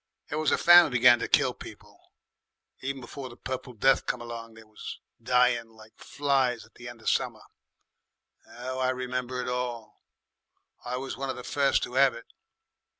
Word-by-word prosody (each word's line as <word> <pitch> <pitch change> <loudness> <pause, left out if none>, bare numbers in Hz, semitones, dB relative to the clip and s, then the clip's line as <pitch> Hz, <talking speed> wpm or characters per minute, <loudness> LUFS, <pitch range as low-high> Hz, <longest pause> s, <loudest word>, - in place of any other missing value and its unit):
"It 150 - -2
was 155 -2 +1
the - - +2
famine 175 -3 +7
began 125 -1 +6
to - - -2
kill - - +3
people. - - -13 0.8
Even 135 0 -4
before 130 +2 -8
the 120 - -13
Purple 130 0 -6
Death 135 +4 +2
came 125 - -1
along 115 -1 -8
they 110 - -13
was 110 0 -9 0.2
dying 125 -2 +2
like 110 -1 -17
flies 135 -5 0
at - - -24
the 120 - -11
end 120 -2 -12
of - - -17
the - - +3
summer. - - -2 1.1
'Ow 130 +2 -6
I 130 0 +1
remember 125 0 -3
it - - -6
all! 125 -2 -4 0.8
I 125 +1 -3
was 135 +1 -5
one 135 0 -4
of 130 - -2
the 125 - -8
first 140 +1 +1
to 130 +2 -1
'ave 135 -4 +4
it. 115 - -12
125 Hz, 185 wpm, -27 LUFS, 120-130 Hz, 1.1 s, famine